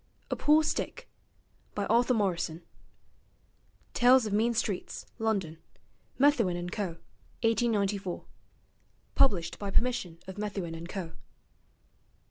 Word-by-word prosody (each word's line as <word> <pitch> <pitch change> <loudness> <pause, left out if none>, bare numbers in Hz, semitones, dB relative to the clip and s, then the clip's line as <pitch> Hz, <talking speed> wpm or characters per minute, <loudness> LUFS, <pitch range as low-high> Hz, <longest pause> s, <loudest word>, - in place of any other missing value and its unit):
'A - - +2
POOR 305 +1 +4
STICK' - - -2 0.7
By 205 - -1
Arthur 240 +4 +3
Morrison 175 -5 -1 1.3
(Tales 250 0 +6
of 210 - -3
Mean 230 +3 +2
Streets, 205 -4 -2
London: 195 -8 -1 0.6
Methuen 245 -11 +3
and 175 0 -5
Co., 180 -5 -3 0.5
1894) 205 -5 0 0.9
Published 190 -11 +2
by 200 - -3
permission 195 -6 0
of 190 +2 -8
Methuen 195 -5 -3
and 165 +1 -7
Co. 180 -5 -5
205 Hz, 105 wpm, -30 LUFS, 180-235 Hz, 1.3 s, Tales